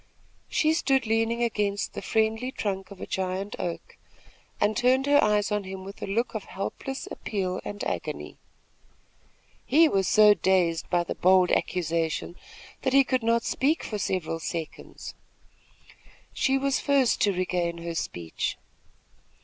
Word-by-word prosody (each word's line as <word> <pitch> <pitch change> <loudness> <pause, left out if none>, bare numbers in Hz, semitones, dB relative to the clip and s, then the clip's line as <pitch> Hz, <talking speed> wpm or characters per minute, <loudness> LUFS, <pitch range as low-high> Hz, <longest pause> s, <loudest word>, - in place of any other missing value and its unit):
She 310 0 +2
stood 270 -6 +2
leaning 225 +2 +1
against 205 -3 -1
the - - -5
friendly 220 +3 0
trunk 195 -5 -3
of 200 - -12
a - - -5
giant 190 +2 -3
oak, 175 -2 -5 0.6
and 210 +1 +2
turned 255 +2 +3
her 285 0 +5
eyes 210 0 +2
on 210 -1 0
him 190 0 -7
with 195 +1 -10
a - - -4
look 225 +5 -1
of 220 -3 -4
helpless 265 +7 -5
appeal 185 -3 -3
and 205 0 -6
agony. - - -4 1.2
He 320 +4 +5
was 195 - +1
so 210 -1 +7
dazed 180 -4 +1
by 175 -1 +2
the - - -4
bold 185 0 +4
accusation, 165 -1 -1 0.5
that 260 - 0
he 275 0 +7
could 255 -1 0
not 230 +1 +2
speak 295 +7 0
for 210 - -4
several 170 -4 -2
seconds. 165 -1 -6 1.2
She 270 -1 +2
was 275 0 +1
first 275 -4 +2
to 205 - +4
regain 180 -2 -1
her 170 0 -5
speech. 85 - -3
205 Hz, 150 wpm, -27 LUFS, 185-245 Hz, 1.2 s, so